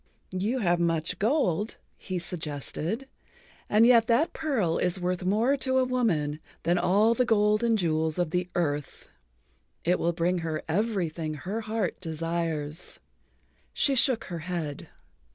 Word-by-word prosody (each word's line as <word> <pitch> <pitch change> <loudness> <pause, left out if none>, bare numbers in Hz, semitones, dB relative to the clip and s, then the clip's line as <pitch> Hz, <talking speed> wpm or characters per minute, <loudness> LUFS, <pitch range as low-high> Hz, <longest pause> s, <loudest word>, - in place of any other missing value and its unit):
"You 205 +8 0
have 175 -3 +2
much 170 0 0
gold," 215 - +1 0.2
he 185 -2 -5
suggested, 170 - -4 0.6
"and 215 +2 +5
yet 235 -2 +6
that 245 +8 +2
pearl 235 - 0
is 180 +1 0
worth 180 0 -1
more 220 +9 +2
to 260 -1 0
a 260 - +4
woman 170 -13 0 0.2
than 175 +2 +2
all 205 +6 +4
the 250 - +2
gold 215 -1 +3
and 230 -1 +3
jewels 160 -3 0
of 175 -3 0
the 180 +1 -1
earth. 145 -4 -2 0.8
It 180 +2 +2
will 170 - +1
bring 175 +1 0
her 160 -2 -3
everything 170 -5 -1
her 195 +9 -4
heart 220 -2 -2
desires." 165 -1 -3 0.8
She 280 - +3
shook 255 -2 +3
her 175 -2 -6
head. 160 -3 -4
180 Hz, 145 wpm, -27 LUFS, 165-225 Hz, 0.8 s, yet